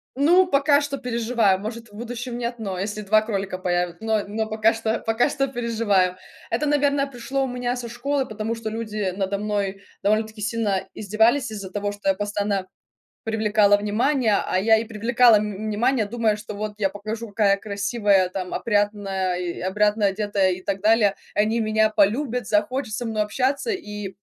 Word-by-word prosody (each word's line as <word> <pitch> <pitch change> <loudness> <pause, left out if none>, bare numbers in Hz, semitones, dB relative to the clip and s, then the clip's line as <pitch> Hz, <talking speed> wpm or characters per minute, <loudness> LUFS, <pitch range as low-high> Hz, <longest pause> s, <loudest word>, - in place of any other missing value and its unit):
Ну, 345 +7 +5
пока 285 -2 +3
что 285 -1 -3
переживаю, 235 -5 +1
может, 225 +2 -7
в - - -21
будущем 240 +1 -5
нет, 240 0 -3
но 195 -4 -4
если 205 +2 -3
2 215 +2 +3
кролика 195 -4 -3
появя 175 -1 -1
но 220 -2 0
но 220 +2 -2
пока 220 +1 +2
что, 225 0 -1
пока 225 +5 +1
что 275 -1 0
переживаю. 220 -7 0 0.3
Это, 245 +7 0
наверное, 285 -1 +2
пришло 270 +1 -2
у - - -3
меня 245 0 -2
со 240 -1 -5
школы, 270 +3 -1
потому 215 +1 -4
что 225 -1 -5
люди 215 -4 -3
надо 195 0 -1
мной 200 -1 -2 0.2
довольно-таки 215 +1 0
сильно 210 -3 -1
издевались 220 +6 +2
из-за 200 -3 -7
того, 205 0 -2
что 205 -1 -2
я 190 - +3
постоянно 205 -1 -2 0.6
привлекала 215 -2 +3
внимание. 220 +2 +1
А 185 - 0
я 220 +2 +5
и 225 - -1
привлекала, 230 +1 +4
м, 210 0 -2
внимание, 235 +2 +1
думая, 220 -1 0
что 210 0 -8
вот 210 0 -4
я 195 -2 +1
покажу, 215 +3 -6
какая 200 -1 +2
я - - +3
красивая 200 -1 +1
там 185 0 -5
опрятная 205 -4 0
и 175 -1 -4
опрятно 210 +2 +2
одетая, 200 -1 +1
и 185 +1 -6
так 195 0 -3
далее. 215 -2 +4 0.2
Они 220 +3 +2
меня 215 0 +2
полюбят, 225 +3 +1
захотят 220 +3 0
со 240 +1 -3
мной 215 -1 0
общаться, 265 - -1
и 210 - -5
215 Hz, 180 wpm, -23 LUFS, 205-235 Hz, 0.6 s, Ну